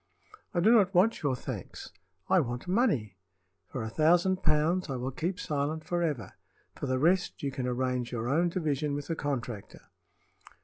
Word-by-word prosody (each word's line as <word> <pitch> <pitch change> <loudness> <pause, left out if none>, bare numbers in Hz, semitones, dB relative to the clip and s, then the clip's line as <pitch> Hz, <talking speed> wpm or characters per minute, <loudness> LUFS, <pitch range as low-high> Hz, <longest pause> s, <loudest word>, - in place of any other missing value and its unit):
I 175 - 0
do 215 +6 +5
not 200 -5 +4
want 205 +6 +4
your 140 -5 +1
thanks; - - -7 0.4
I 190 - +5
want 120 -1 -3
money. 175 - +1 0.5
For 125 - -5
a 110 - -4
thousand 175 +6 +3
pounds 160 +4 +2
I 135 - -2
will 125 +1 -3
keep 175 +7 -3
silent 150 +1 -2
forever. 160 - -2 0.4
For - - -5
the 130 0 +1
rest, 175 +6 +1
you 140 - -1
can 130 -1 -3
arrange 125 -1 -1
your 120 -1 -3
own 165 +6 +2
division 150 -4 -1
with 145 -1 -4
the 165 - -2
contractor." 125 -8 -5
150 Hz, 170 wpm, -29 LUFS, 130-175 Hz, 0.5 s, do